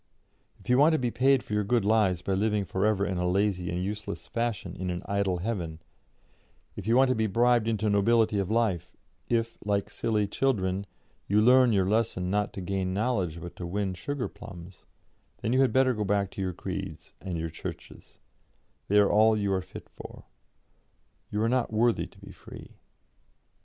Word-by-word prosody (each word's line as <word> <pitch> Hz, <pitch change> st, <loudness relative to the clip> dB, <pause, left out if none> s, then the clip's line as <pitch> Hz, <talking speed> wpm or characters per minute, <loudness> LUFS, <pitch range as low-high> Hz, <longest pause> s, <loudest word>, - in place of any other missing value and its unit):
If -, -, -19 dB
you 125 Hz, +1 st, +4 dB
want 155 Hz, +3 st, +6 dB
to -, -, +3 dB
be 125 Hz, -4 st, -1 dB
paid 130 Hz, +2 st, +3 dB
for -, -, -7 dB
your 105 Hz, 0 st, +1 dB
good 115 Hz, 0 st, +1 dB
lives 100 Hz, -5 st, +2 dB
by 95 Hz, -, -1 dB
living 105 Hz, +1 st, +1 dB
for 95 Hz, +4 st, 0 dB
ever 100 Hz, -2 st, +1 dB
in 95 Hz, -3 st, -2 dB
a 90 Hz, 0 st, 0 dB
lazy 95 Hz, -2 st, 0 dB
and 90 Hz, +1 st, -2 dB
useless 105 Hz, +2 st, -5 dB
fashion 115 Hz, -5 st, -3 dB
in 90 Hz, 0 st, -4 dB
an 90 Hz, 0 st, -4 dB
idle 100 Hz, -2 st, 0 dB
heaven; 85 Hz, -5 st, -4 dB, 1.0 s
if 105 Hz, -, -7 dB
you 115 Hz, +2 st, +4 dB
want 135 Hz, 0 st, +5 dB
to 130 Hz, -, +2 dB
be 110 Hz, 0 st, +1 dB
bribed 120 Hz, +2 st, +3 dB
into 110 Hz, -1 st, 0 dB
nobility 105 Hz, +1 st, +3 dB
of 95 Hz, -, -2 dB
life; 100 Hz, -7 st, 0 dB, 0.3 s
if, 115 Hz, -1 st, -1 dB
like 100 Hz, -1 st, -1 dB
silly 105 Hz, -2 st, 0 dB
children, 100 Hz, -5 st, 0 dB, 0.4 s
you 105 Hz, +2 st, +3 dB
learn 125 Hz, +2 st, +6 dB
your 95 Hz, -3 st, +2 dB
lesson 105 Hz, -4 st, 0 dB
not 105 Hz, +1 st, 0 dB
to 95 Hz, -, -6 dB
gain 95 Hz, 0 st, -2 dB
knowledge 100 Hz, -7 st, -1 dB
but 85 Hz, +1 st, -9 dB
to 90 Hz, -, -5 dB
win 95 Hz, +1 st, -2 dB
sugar 135 Hz, +8 st, -3 dB
plums, 90 Hz, -1 st, -12 dB, 0.6 s
then 115 Hz, -, 0 dB
you 130 Hz, -, +4 dB
had 135 Hz, -, +3 dB
better 130 Hz, -1 st, +3 dB
go 105 Hz, -2 st, -2 dB
back 100 Hz, -1 st, 0 dB
to -, -, -6 dB
your 95 Hz, -1 st, -1 dB
creeds -, -, -6 dB
and 95 Hz, -3 st, -4 dB
your 80 Hz, 0 st, -4 dB
churches; 80 Hz, -, -9 dB, 0.7 s
they 105 Hz, -, +3 dB
are 100 Hz, -1 st, +5 dB
all 110 Hz, +1 st, +5 dB
you 100 Hz, -2 st, 0 dB
are 95 Hz, -, 0 dB
fit -, -, -11 dB
for; -, -, -12 dB, 1.1 s
you 105 Hz, -, -2 dB
are -, -, +2 dB
not 125 Hz, -1 st, 0 dB
worthy 115 Hz, +1 st, +2 dB
to -, -, -22 dB
be -, -, -12 dB
free. -, -, -12 dB
105 Hz, 195 wpm, -28 LUFS, 95-115 Hz, 1.1 s, want